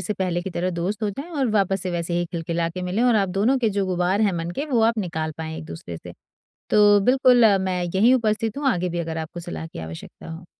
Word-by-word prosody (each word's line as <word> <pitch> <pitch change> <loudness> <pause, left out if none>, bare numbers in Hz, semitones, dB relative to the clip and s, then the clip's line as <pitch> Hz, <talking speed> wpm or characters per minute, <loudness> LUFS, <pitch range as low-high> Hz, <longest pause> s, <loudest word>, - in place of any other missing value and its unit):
से 185 +4 -2
पहले 180 -2 -1
की 190 - -5
तरह 180 +1 -2
दोस्त 180 +5 -3
हो 210 - +1
जाएँ 275 - -8
और 275 -7 0
वापस 195 -3 +1
से 185 - -3
वैसे 170 0 -2
ही 175 - 0
खिलखिला 170 0 -2
के 180 +2 -6
मिलें 185 +6 -1
और 245 -1 +4
आप 195 -2 +1
दोनों 205 +8 +2
के 230 - +1
जो 195 -1 -1
गुबार 180 +2 0
हैं 205 -3 +3
मन 165 0 -3
के, 275 +11 -3
वो 255 -6 +1
आप 230 0 +2
निकाल 160 -5 -3
पाएँ 160 0 -5
एक 160 - -8
दूसरे 85 - -8
से। - - -10 0.6
तो 205 -1 +6
बिल्कुल 250 +1 +5 0.2
मैं 185 -1 -1
यहीं 230 +6 +5
उपस्थित 225 -1 0
हूँ 285 - -1
आगे 180 -6 0
भी 175 0 -3
अगर 165 -1 -4
आपको 160 +2 -6
सलाह 170 -1 -6
की 165 - -10
आवश्यकता 80 - -9
हो। 165 +2 -8
185 Hz, 255 wpm, -23 LUFS, 170-215 Hz, 0.6 s, तो